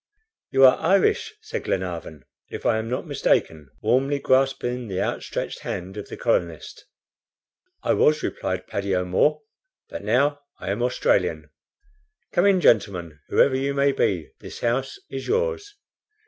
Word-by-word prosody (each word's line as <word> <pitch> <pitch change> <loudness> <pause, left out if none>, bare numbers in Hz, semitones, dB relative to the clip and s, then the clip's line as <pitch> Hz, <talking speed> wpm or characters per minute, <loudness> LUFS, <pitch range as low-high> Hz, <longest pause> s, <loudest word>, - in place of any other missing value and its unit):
"You 135 0 +6
are 130 - +6
Irish," 185 +3 +2
said - - -5
Glenarvan, 85 -6 -4 0.2
"if - - -7
I 110 - +3
am 110 +1 -4
not 125 - -2
mistaken," 75 -4 0
warmly 135 +3 +2
grasping 130 -2 +1
the 95 -2 -3
outstretched - - -3
hand 90 +2 -5
of 105 - -7
the - - -7
colonist. 85 -2 -2 1.0
"I - - +2
was," 150 0 +3
replied 95 0 -3
Paddy 100 -1 -2
O'Moore, 95 +12 +1 0.5
"but - - -6
now 140 +7 +2 0.2
I 95 - -4
am 105 +4 -2
Australian. 125 +1 0 0.8
Come 180 +3 +3
in, 195 -2 +4
gentlemen, 90 - +2
whoever 135 - +4
you 140 +1 -1
may 140 0 +3
be, 90 - -1
this - - -10
house 125 +3 -1
is - - -5
yours." 440 -3 -1
125 Hz, 145 wpm, -24 LUFS, 95-140 Hz, 1.0 s, You